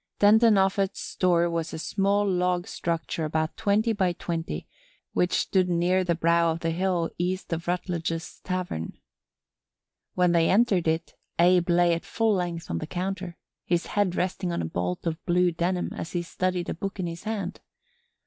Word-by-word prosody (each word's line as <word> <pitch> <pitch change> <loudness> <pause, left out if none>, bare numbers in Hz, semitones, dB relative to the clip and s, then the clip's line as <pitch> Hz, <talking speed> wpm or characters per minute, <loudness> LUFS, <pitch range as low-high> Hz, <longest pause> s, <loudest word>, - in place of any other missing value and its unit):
Denton 215 +1 +6
Offut's 195 0 +1
store 175 -2 +1
was 165 -1 -2
a - - -4
small 200 +4 +1
log 180 -1 +1
structure 165 -1 -3
about 155 +1 -1
twenty 215 +3 +2
by 185 -4 +1
twenty 165 -1 -4 0.5
which 180 0 +2
stood 185 -2 +2
near 180 +2 +2
the 175 -2 +1
brow 170 0 +3
of 165 +1 -4
the 165 - 0
hill 175 -1 0
east 180 0 -2
of 165 +1 -4
Rutledge's 170 -2 -3
Tavern. 180 - -3 1.2
When 180 -1 +3
they 170 -1 +3
entered 195 -5 +3
it 160 +1 -1 0.2
Abe 175 0 +4
lay 175 0 +4
at 165 - -2
full 225 -1 +1
length 175 - -2
on 85 - -1
the - - -5
counter, 185 0 -4 0.3
his 175 -1 0
head 200 -4 0
resting 180 0 -1
on 130 - -1
a - - -2
bolt 90 - -3
of 165 0 -3
blue 180 0 +3
denim 175 +2 -1
as 165 - -6
he 175 -1 -1
studied 180 0 -2
a - - -1
book 195 +3 -5
in 185 - -1
his 170 +3 -6
hand. 200 -4 -3
175 Hz, 175 wpm, -26 LUFS, 170-185 Hz, 1.2 s, Denton